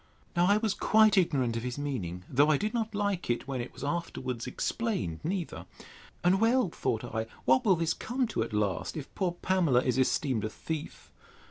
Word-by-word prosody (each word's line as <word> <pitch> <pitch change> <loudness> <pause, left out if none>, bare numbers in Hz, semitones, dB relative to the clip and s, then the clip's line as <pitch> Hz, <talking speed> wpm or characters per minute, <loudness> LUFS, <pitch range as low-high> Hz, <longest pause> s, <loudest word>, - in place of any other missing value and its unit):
Now 175 +1 +4
I 205 +2 +5
was 215 -2 0
quite 215 +1 +4
ignorant 140 - +2
of 115 - -2
his 125 +2 -4
meaning; 100 -12 -4
though 145 +4 +3
I 155 - +4
did 210 +5 -2
not 225 -2 -2
like 205 -6 -1
it, 120 - -1
when 130 -3 -2
it 120 - -6
was - - -10
afterwards 135 -6 -3
explained, 185 - -2
neither: 175 0 -3 0.6
And 185 +3 +3
well, 230 -2 +3
thought 115 -7 -2
I, 110 -1 -3 0.2
what 130 +1 +4
will 195 -4 +5
this 165 -1 0
come 250 +3 -1
to 165 - -1
at 115 - -2
last, 105 - -1
if 145 - -7
poor 185 -3 -1
Pamela 170 -10 +3
is 125 0 +1
esteemed 130 -3 +1
a 110 - -1
thief! 155 +6 -6
155 Hz, 200 wpm, -30 LUFS, 125-195 Hz, 0.6 s, I